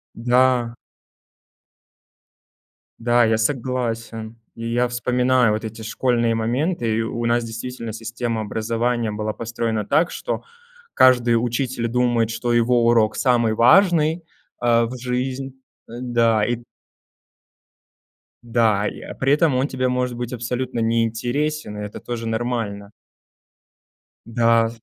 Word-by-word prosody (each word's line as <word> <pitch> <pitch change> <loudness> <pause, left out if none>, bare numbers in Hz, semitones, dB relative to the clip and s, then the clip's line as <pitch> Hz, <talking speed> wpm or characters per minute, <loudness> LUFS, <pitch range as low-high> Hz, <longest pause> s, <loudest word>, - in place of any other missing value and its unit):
Да. 120 0 +2 2.2
Да, 120 +1 +3
я 110 0 +2
согласен. 115 -2 -2 0.2
И 115 0 -5
я 125 +1 +2
вспоминаю 125 -1 +2
вот 110 - -3
эти 110 0 -7
школьные 115 0 0
моменты, 120 +1 -1
и - - +1
у 115 +1 -3
нас 120 0 +1
действительно 115 0 -6
система 115 0 -3
образования 115 +2 -1
была 105 +1 -3
построена 115 -1 -3
так, 165 - +2
что - - -4 0.5
каждый 125 -2 +5
учитель 120 +1 -1
думает, 120 -1 +1
что 115 +1 -2
его 120 0 +3
урок 115 -2 +3
самый 120 -4 +2
важный, 160 - +4 0.4
э, 120 -1 +3
в 120 +2 -4
жизнь 130 +2 -3 0.3
э, - - -12
да 115 -3 +2
и 120 0 -2 1.8
Да, 115 -3 +2
и, - - -6
э, - - -8
при 135 +2 +2
этом 150 -2 +3
он 130 +2 +1
тебе 130 -2 -1
может 125 -1 -1
быть 120 0 -5
абсолютно 125 +1 -3
неинтересен, 115 +3 -1
и - - -5
это 105 - -8
тоже 115 -1 -5
нормально. 110 -3 -3 1.4
Да. 115 0 +3
120 Hz, 125 wpm, -21 LUFS, 115-125 Hz, 2.2 s, каждый